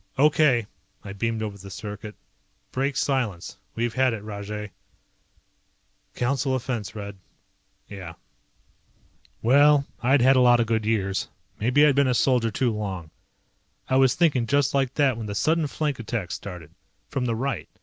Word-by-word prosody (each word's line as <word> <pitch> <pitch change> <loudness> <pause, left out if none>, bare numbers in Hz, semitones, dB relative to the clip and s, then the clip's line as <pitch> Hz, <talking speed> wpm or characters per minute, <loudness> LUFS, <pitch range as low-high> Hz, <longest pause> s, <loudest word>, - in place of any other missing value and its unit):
"Okay," 140 -4 +4 0.4
I 100 - -7
beamed 115 +2 -2
over 100 -2 -5
the 100 +1 -10
circuit, 105 +1 -7 0.6
"break 135 +1 -1
silence. 125 -12 -1 0.2
We've 115 0 -1
had 130 -2 +2
it 105 -2 -6
Rajay." 105 0 -6 1.4
"Council 130 +1 0
offense, 115 -6 -4
Red." 100 -1 -7 0.7
"Yeah." 95 -5 -8 1.3
Well, 140 +4 +5 0.2
I'd 135 +2 +3
had 130 +2 +6
a - - +5
lot 120 -1 +6
of 115 - +2
good 110 -1 -1
years. 95 -4 0 0.3
Maybe 125 +7 +4
I'd 150 - +5
been 140 0 +3
a 125 - +2
soldier 120 -1 +2
too 120 +1 0
long. 95 -6 -5 0.8
I 130 - +3
was 130 -2 +4
thinking 145 -9 +2
just 140 +1 +2
like 135 -2 0
that 135 -5 +2
when 110 -2 -5
the 100 - -4
sudden 160 +7 +1
flank 145 -2 -2
attack 110 -6 -4
started. 90 -6 -7 0.4
From 130 -2 -2
the 115 -2 0
right. 135 +4 -3
120 Hz, 155 wpm, -25 LUFS, 105-135 Hz, 1.4 s, had